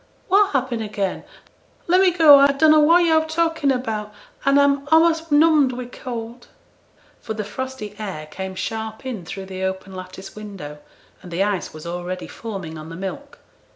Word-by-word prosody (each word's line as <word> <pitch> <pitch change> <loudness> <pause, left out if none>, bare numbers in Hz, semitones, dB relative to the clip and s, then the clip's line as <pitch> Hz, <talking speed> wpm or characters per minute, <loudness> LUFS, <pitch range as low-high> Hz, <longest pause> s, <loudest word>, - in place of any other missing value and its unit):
'What 400 +1 +5
happen 255 -4 -1
again? 205 -3 -3 0.6
Let 365 +2 +4
me 380 - +6
go, 320 -5 +7
I 280 0 +5
dunno 310 +2 +5
what 335 +4 +5
yo're 320 -1 +4
talking 325 -2 +1
about, 220 -5 -3 0.3
and 275 +1 +4
I'm 280 0 +2
a'most 325 0 +3
numbed 295 -3 +4
wi' 250 0 -5
cold.' 240 -1 -8 0.7
For 220 - -6
the 215 - -3
frosty 235 0 -6
air 190 -8 -5
came 190 +4 -7
sharp 220 +4 -5
in 225 -9 -5
through 195 +3 -7
the 190 0 -7
open 190 0 -4
lattice 185 +1 -9
window, 195 -9 -9 0.4
and 180 - -11
the 175 +3 0
ice 200 -3 -2
was 155 +1 -11
already 175 +1 -5
forming 190 -8 -7
on 155 +1 -9
the 165 - -8
milk. 195 +11 -7
225 Hz, 170 wpm, -21 LUFS, 190-285 Hz, 0.7 s, go